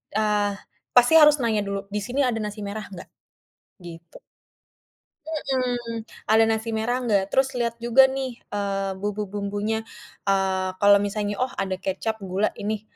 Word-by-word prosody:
eee, 210 -1 +1 0.4
pasti 245 +4 +6
harus 300 -1 +8
nanya 220 -3 +1
dulu, 200 0 -2 0.2
"Di - - +1
sini 265 +3 0
ada 245 -4 0
nasi 210 +1 -5
merah 215 +1 -5
enggak?" 185 - -10 0.7
Gitu. 170 -1 -12 1.1
Mhm, 250 -6 -2 0.3
ada 220 +1 +6
nasi 225 +1 -1
merah 220 +3 0
enggak, 200 -5 +1
terus 265 0 +2
lihat 235 -1 -1
juga 240 +3 +5
nih, 265 -2 -4
eee, 195 -1 -2
bumbu-bumbunya, 205 +2 -3 0.4
eee, 190 -1 +1
kalau 205 0 +7
misalnya 205 0 -2
oh 255 +1 -1
ada 190 -1 -2
kecap, 220 +4 -3
gula, 190 +3 0
ini, 210 0 -3
215 Hz, 145 wpm, -24 LUFS, 200-240 Hz, 1.1 s, harus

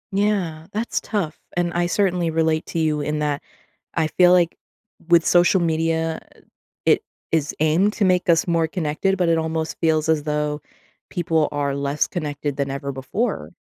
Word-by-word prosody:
Yeah, 190 -6 0
that's 220 +3 -2
tough 185 -8 -3 0.2
and 175 -1 0
I 175 0 +1
certainly 180 -2 +1
relate 160 0 0
to - - -5
you 155 -2 +1
in 150 +1 -2
that 145 -1 -1 0.5
I 165 - +2
feel 180 +3 +4
like 175 -2 +3 0.5
with 170 -1 +5
social 175 +2 +4
media, 165 -1 0 0.2
eh, - - -21 0.5
it - - +4 0.3
is 155 -2 0
aimed 170 +7 +3
to 210 - +1
make 180 -1 +2
us 165 -1 +4
more 165 -2 +2
connected, 175 +3 -1
but 180 -3 +1
it 165 - +3
almost 160 0 -2
feels 160 -2 +2
as 155 -2 +2
though 150 0 -1 0.5
people 165 -3 +1
are 145 -1 -1
less 140 +1 0
connected 145 -4 -4
than 140 -1 -1
ever 140 0 -4
before. 135 - -3
160 Hz, 170 wpm, -22 LUFS, 150-175 Hz, 0.5 s, with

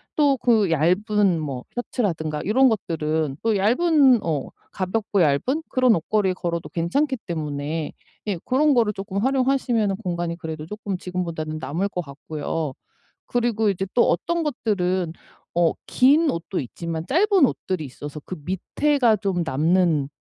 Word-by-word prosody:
또 285 -3 +3
그 220 -7 +3
얇은 185 +3 +2
뭐 135 -4 -5
셔츠라든가 165 - -2
이런 260 +6 +5
것들은 155 - -1
또 225 -2 +2
얇은 260 - +4
어 150 -5 -1 0.2
가볍고 200 +1 -1
얇은 170 - +2
그런 255 -3 +4
옷걸이에 190 +3 +1
걸어도 170 -2 -3
괜찮기 265 - 0
때문에 150 -1 -3 0.4
예 195 -4 -1
그런 290 +3 +3
거를 225 -4 +2
쪼끔 195 0 -6
활용하시면은 255 -5 +1
공간이 175 -4 -3
그래도 160 -3 -6
쪼금 205 0 -5
지금보다는 170 -4 -4
남을 180 +7 -2
것 180 - -5
같고요. 150 0 -4 0.5
그리고 230 -3 +1
이제 195 0 -2
또 240 - +4
어떤 340 -1 0
것들은 185 - -1 0.5
어 170 -2 +4
긴 290 +5 +4
옷도 170 +3 -3
있지만 165 +5 -5
짧은 375 0 +4
옷들이 185 -8 -3
있어서 145 +3 -8
그 185 - -5
밑에가 235 - +1
좀 195 -2 -2
예 175 - +1
남는 160 0 +2
190 Hz, 310 characters per minute, -23 LUFS, 160-240 Hz, 0.5 s, 이런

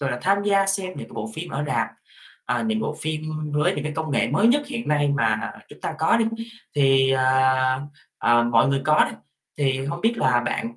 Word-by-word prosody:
gọi 140 -1 -1
là, 120 - -3
tham 200 +2 +2
gia 200 -1 +2
xem 195 -1 0
những - - -8
cái - - -14
bộ 110 0 -5
phim 170 +2 -6
ở 145 +2 -2
rạp, 115 -6 0 0.6
ờ, - - -1
những - - -1
cái 220 0 0
bộ 150 - -3
phim 155 0 -3 0.3
với 150 +1 +1
những 145 - -4
cái 150 - -3
công 160 -1 -3
nghệ 115 -4 +1
mới 180 - +2
nhất 290 +4 +3
hiện 240 - -5
nay 145 -1 +2
mà 115 -6 0 0.2
chúng - - -15
ta 160 - -4
có 160 +6 +3
đi, 230 - +2 0.5
thì, 135 -2 +4
à, 130 0 +2 0.4
ờ, 120 0 +4
mọi 120 +2 +3
người 135 0 0
có 150 +1 +5
đi, - - -11 0.4
thì 135 -1 0
hông 145 +5 -4
biết 225 +4 +2
là 125 - +2
bạn 115 +1 -3
145 Hz, 235 wpm, -23 LUFS, 130-175 Hz, 0.6 s, có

